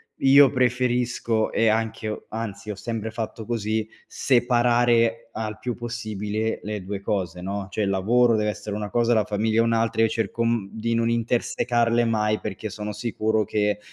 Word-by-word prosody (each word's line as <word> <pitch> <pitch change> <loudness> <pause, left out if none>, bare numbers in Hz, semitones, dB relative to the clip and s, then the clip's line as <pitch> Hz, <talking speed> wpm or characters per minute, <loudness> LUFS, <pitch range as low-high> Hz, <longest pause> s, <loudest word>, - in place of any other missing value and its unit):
io 135 0 +6
preferisco 125 -3 +1
e 115 - +2
anche 110 0 0
ho 105 - -5
anzi 110 -1 -6
ho - - -5
sempre 110 +1 -4
fatto 110 0 -5
così, 110 -1 -1 0.2
separare 120 -2 +2
al 110 0 -4
più 120 +1 -3
possibile 110 -2 -3
le 105 -1 -4
2 100 +1 -5
cose, 90 -4 -2
no, 100 +1 -4
cioè 110 - -3
il 100 - +1
lavoro 115 +5 +3
deve 105 0 +1
essere 105 0 -7
una 105 -1 -4
cosa, 120 +1 +2
la 110 -2 +2
famiglia 110 +2 0
è - - +5
un'altra, 115 -1 +1
e 115 - +5
cerco, 115 +1 -2
mhmm, 115 -4 0
di 115 +1 -2
non 115 0 +1
intersecarle 120 0 +1
mai 110 -1 +1
perché 105 +1 -5
sono 105 +1 -5
sicuro 110 0 0
che 105 0 0
110 Hz, 170 wpm, -24 LUFS, 105-120 Hz, 0.2 s, io